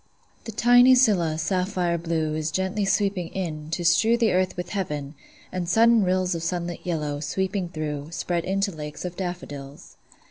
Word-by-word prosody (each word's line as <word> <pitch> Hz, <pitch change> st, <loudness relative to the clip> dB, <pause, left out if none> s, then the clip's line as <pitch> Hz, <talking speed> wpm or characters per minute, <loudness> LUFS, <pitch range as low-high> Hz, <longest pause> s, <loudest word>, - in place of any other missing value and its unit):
The 225 Hz, -, -5 dB
tiny 245 Hz, +3 st, +6 dB
scilla, 190 Hz, -11 st, +3 dB
sapphire 180 Hz, 0 st, 0 dB
blue, 160 Hz, -2 st, -1 dB
Is 155 Hz, 0 st, -2 dB
gently 190 Hz, +5 st, -1 dB
sweeping 195 Hz, -3 st, 0 dB
in, 155 Hz, -5 st, -4 dB
to 170 Hz, +2 st, -3 dB
strew 220 Hz, +8 st, +4 dB
The 230 Hz, -2 st, +2 dB
earth 185 Hz, 0 st, 0 dB
with 180 Hz, 0 st, -4 dB
heaven; 150 Hz, -8 st, -3 dB, 0.4 s
and 180 Hz, -2 st, -3 dB
sudden 230 Hz, +2 st, +5 dB
rills 185 Hz, 0 st, +1 dB
Of 165 Hz, -, -3 dB
sunlit 170 Hz, 0 st, -3 dB
yellow, 150 Hz, -5 st, -2 dB
sweeping 185 Hz, +5 st, -2 dB
through, 150 Hz, -2 st, -4 dB
Spread 170 Hz, 0 st, -2 dB
into 195 Hz, +2 st, 0 dB
lakes 150 Hz, 0 st, -7 dB
of 180 Hz, -1 st, -5 dB
daffodils. 145 Hz, -7 st, -7 dB
180 Hz, 165 wpm, -25 LUFS, 160-195 Hz, 0.4 s, tiny